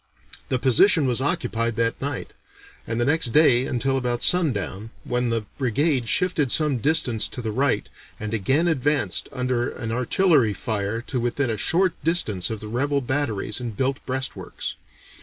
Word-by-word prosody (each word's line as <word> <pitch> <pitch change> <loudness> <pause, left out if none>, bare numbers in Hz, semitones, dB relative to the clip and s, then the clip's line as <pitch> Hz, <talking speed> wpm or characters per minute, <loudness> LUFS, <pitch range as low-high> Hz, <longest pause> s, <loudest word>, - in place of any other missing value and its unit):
The 130 - +1
position 140 - +4
was 125 -1 +1
occupied 115 -4 -1
that 115 +1 -1
night, 140 -1 -4 0.5
and 115 +1 -2
the 120 - +2
next 160 0 +3
day 135 -5 +5
until 135 +2 0
about 120 -2 -1
sundown, 115 - +1
when 125 0 -1
the 115 -2 -1
brigade 130 0 +1
shifted 180 - +1
some 150 -5 +2
distance 125 -5 +1
to - - -9
the 110 -3 -3
right 125 -3 0 0.3
and 110 +1 -4
again 135 - +1
advanced 145 - 0
under 125 -1 -1
an 115 -3 -5
artillery 125 - +2
fire 110 +2 -2
to 130 - -3
within 120 +1 -1
a - - -1
short 180 - +2
distance 110 - 0
of 110 -2 -5
the 110 - -7
rebel 140 +5 0
batteries 120 -5 -2
and 115 -5 -6
built 135 0 -1
breastworks. 130 +1 -4
125 Hz, 160 wpm, -24 LUFS, 115-145 Hz, 0.5 s, day